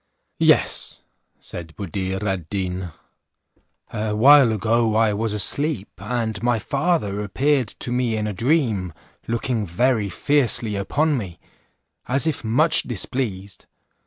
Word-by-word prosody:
"Yes," - - +2 0.4
said 80 -2 -8
Buddir 95 0 -4
ad 95 -5 -3
Deen, 95 -2 -3 1.0
"a 105 0 -2
while 135 +2 +7
ago 110 +1 +1
I 110 -1 +3
was 110 +2 -2
asleep, 105 +3 0
and 110 +2 -3
my 120 0 +1
father 135 - -1
appeared 130 +5 +1
to 120 - -7
me 120 -3 0
in 105 - -2
a 105 - -3
dream, 115 - 0 0.3
looking 115 0 -1
very 105 +3 0
fiercely 120 -5 +1
upon 140 +8 0
me, 90 -6 -8 0.7
as 135 +4 +2
if 160 -5 -1
much 130 +9 +4
displeased. 105 -4 -3
110 Hz, 125 wpm, -22 LUFS, 100-130 Hz, 1.0 s, while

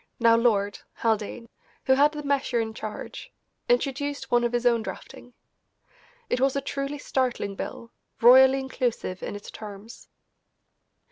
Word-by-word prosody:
(now 230 -1 +5
Lord) 205 -4 +1 0.2
Haldane, 225 +1 -1 0.4
who 265 - +5
had 285 +3 +4
the 300 -1 -6
measure 275 -4 0
in 220 -1 -2
charge, 215 -1 -7 0.4
introduced 285 - -1
one 240 0 +4
of 240 - +1
his 240 0 -1
own 235 -2 +4
drafting. 245 +2 -9 0.9
It 250 - -1
was 270 0 +2
a - - +2
truly 275 +1 -4
startling 255 -7 -1
bill, 230 +4 -7 0.3
royally 260 +3 +7
inclusive 245 -8 -3
in - - -5
its 205 - -9
terms. 210 +1 -10
240 Hz, 140 wpm, -26 LUFS, 225-270 Hz, 0.9 s, royally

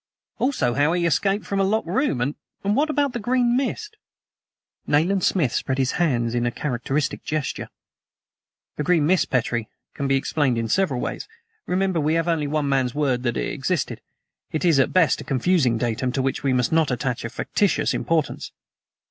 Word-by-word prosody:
"Also, 250 - +1
how 145 +5 +2
he 175 -1 +1
escaped 195 +5 +1
from 200 - -2
a - - +3
locked 215 +3 +1
room. 175 - 0
And 140 +4 -1 0.4
what 300 +4 +2
about 285 -3 +1
the 240 - -3
green 240 +1 +2
mist?" 420 - -2 0.9
Nayland 175 +6 +2
Smith 150 - +2
spread 130 - -1
his 130 -1 +1
hands 120 -9 0
in 120 0 0
a - - 0
characteristic 135 +2 -2
gesture. 155 -2 -3 1.1
"The 150 - -1
green 165 -2 +3
mist, 180 +2 +2
Petrie, 120 -3 -1 0.2
can 140 - -3
be 135 - +3
explained 135 -2 +1
in 115 -1 -2
several 180 - +1
ways. - - -4 0.4
Remember, 185 -1 +1
we 155 +2 +1
have 165 0 0
only 160 -4 0
one 150 0 -1
man's 130 -2 +1
word 135 -5 +1
that 120 -2 -1
it - - -2
existed. 155 +2 -2 0.5
It 155 - -1
is 165 -5 +4
at 130 - +3
best 180 -4 +3
a - - -7
confusing 135 -3 +2
datum 120 +2 -1
to 135 - 0
which 135 - -1
we 135 - +1
must 125 -2 +1
not 160 -2 +3
attach 125 -1 -2
a 115 - -3
factitious 200 - 0
importance." 160 -3 -1
150 Hz, 185 wpm, -23 LUFS, 130-185 Hz, 1.1 s, is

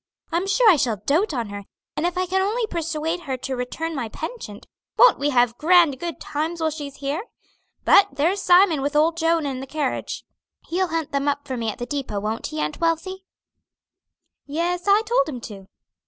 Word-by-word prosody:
I'm 345 +4 0
sure 460 +4 +3
I 370 -6 +7
shall 240 -6 0
dote 335 +9 +2
on 235 -6 -3
her; 200 0 -7 0.3
and 335 - 0
if 355 0 -4
I 370 - +1
can 380 +1 0
only 440 +4 0
persuade 330 -2 -2
her 270 -6 -4
to 260 +1 -4
return 315 +7 -4
my 240 -5 -3
penchant, 310 - -7 0.3
won't - - +6
we 285 +1 +1
have 245 -3 +2
grand 330 -4 +4
good 340 -2 -5
times 315 +3 -3
while 320 -1 0
she's 290 -3 -7
here? 285 +9 -3 0.6
But 400 - +7
there's 335 +8 +1
Simon 355 -5 +5
with 285 +2 -2
old 320 +2 +3
Joan 330 -1 +1
and 265 -2 -3
the 270 - -7
carriage. 290 -2 -3 0.4
He'll 370 +2 +1
hunt 325 -2 -3
them 280 0 -1
up 285 0 -1
for 260 - -3
me 230 -2 -2
at 210 - -5
the 240 - -4
depot; 270 -6 -3
won't 215 +2 -3
he, 155 - -5
Aunt 150 0 -2
Wealthy?" 370 +3 -1 1.2
"Yes, 345 +4 -2
I 405 +2 +5
told 440 - +1
him 255 -5 -5
to." 195 -4 -10
310 Hz, 200 wpm, -23 LUFS, 265-350 Hz, 1.2 s, I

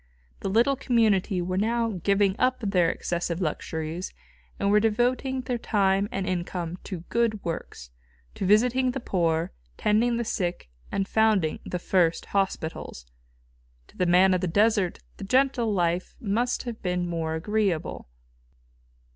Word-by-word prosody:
The - - -3
little 235 +7 +3
community 215 -8 +2
were 185 +1 -1
now 230 +2 +1
giving 200 -1 +3
up 255 0 +2
their 185 -5 +2
excessive 170 0 -2
luxuries 160 0 -3 0.4
and 200 0 +1
were 210 - +6
devoting 245 +4 +1
their 250 -2 -3
time 195 -2 +1
and 195 -1 -2
income 180 -1 -3
to 185 -5 -5
good 230 -2 +1
works, 60 - -5 0.4
to - - -5
visiting 250 +5 +4
the 260 +2 -2
poor, 170 -7 0 0.3
tending 230 +3 +2
the 235 - -2
sick 175 - -3 0.2
and 195 -1 -1
founding 215 -8 +2
the 180 - -2
first 175 -1 +1
hospitals. 165 - -2 0.8
To - - -21
the 180 - +1
man 185 +2 +5
of 180 - +1
the 185 - 0
desert 205 0 +2 0.2
the - - -8
gentle 255 +1 +2
life 175 -2 0
must 235 +4 -1
have 235 -3 -6
been 180 -1 -1
more 165 -2 -2
agreeable. 195 - -1
195 Hz, 145 wpm, -26 LUFS, 175-225 Hz, 0.8 s, were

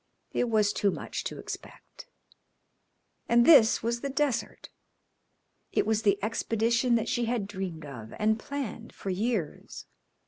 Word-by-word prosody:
It 245 - 0
was 210 -2 +3
too 205 - +2
much - - -4
to - - -4
expect. - - -9 1.2
And 235 0 +5
this 260 -11 +7
was 235 +1 -1
the 280 - -3
desert! 275 -2 -2 1.0
It - - +1
was 220 0 +1
the 200 -2 +3
expedition 230 +2 +1
that 230 0 0
she 240 0 0
had 230 -3 -1
dreamed 185 -6 -6
of 115 -6 -9
and 220 +1 +2
planned 250 -4 -6
for 195 - -4
years. 200 -4 -3
225 Hz, 140 wpm, -28 LUFS, 205-240 Hz, 1.2 s, this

